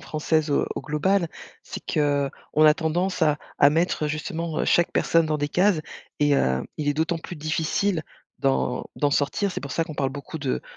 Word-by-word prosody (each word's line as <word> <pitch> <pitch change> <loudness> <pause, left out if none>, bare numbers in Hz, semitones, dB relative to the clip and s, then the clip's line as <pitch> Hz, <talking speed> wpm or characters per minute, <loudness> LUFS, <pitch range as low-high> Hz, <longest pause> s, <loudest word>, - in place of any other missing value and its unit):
française 155 0 0
au 140 - +2
au - - -3
global, 170 +4 +1 0.3
c'est - - -8
qu'on 145 -2 +1 0.3
a 150 0 +7
tendance 175 +4 -1
à 150 -2 +3 0.2
à 140 - +7
mettre 160 0 +1
justement, 160 +1 -3
heu, - - +1
chaque 175 - +3
personne 165 -1 +3
dans 155 -1 0
des 145 0 -1
cases 180 0 +3 0.4
et 145 -1 +3
heu, 65 - +1
il 145 -1 -1
est 145 - +2
d'autant 160 +2 0
plus 175 +1 -8
difficile 160 +3 0 0.4
d'en 65 -1 0
d'en 145 -1 +1
sortir. 150 +8 0
C'est - - -4
pour 140 -2 -6
ça 165 - 0
qu'on 155 - -8
parle 135 -2 0
beaucoup 145 +4 -7
de 135 -3 -2
155 Hz, 195 wpm, -24 LUFS, 145-165 Hz, 0.4 s, a